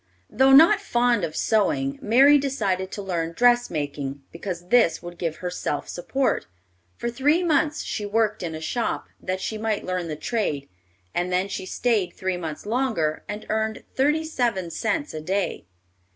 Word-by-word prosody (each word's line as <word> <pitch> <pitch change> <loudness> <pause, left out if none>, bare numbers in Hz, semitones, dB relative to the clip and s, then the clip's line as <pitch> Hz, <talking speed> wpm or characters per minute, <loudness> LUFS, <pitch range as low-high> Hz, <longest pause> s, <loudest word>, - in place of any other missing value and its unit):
Though 265 +4 +4
not 330 +9 +7
fond 240 - +2
of 160 -2 -3
sewing, 140 -11 +1
Mary 275 +7 +6
decided 200 -9 -1
to 205 - -5
learn 170 -3 -2
dressmaking, 150 - +1
because 175 0 -6
this 205 -10 +4
would 175 0 -9
give 165 -3 -2
her 180 -1 -5
self - - -3
support. 265 +9 -1 0.5
For - - -3
three 285 +9 +2
months 305 -2 +1
she 210 - -3
worked 215 0 +1
in 165 -3 -4
a 155 - -7
shop, 235 +8 -2
that 185 0 -2
she 215 +2 -3
might 220 -1 -1
learn 180 -2 -2
the 155 - -3
trade, 150 - -2 0.5
and 175 +1 -1
then 185 +2 +1
she 190 -1 -5
stayed 210 -7 0
three 185 -1 -2
months 160 -2 -6
longer 220 -10 0
and 210 +1 -5
earned 220 0 -1
thirty 300 +4 +2
seven 235 - -1
cents 285 - -2
a 155 - -5
day. 190 - -2
205 Hz, 165 wpm, -24 LUFS, 175-245 Hz, 0.5 s, not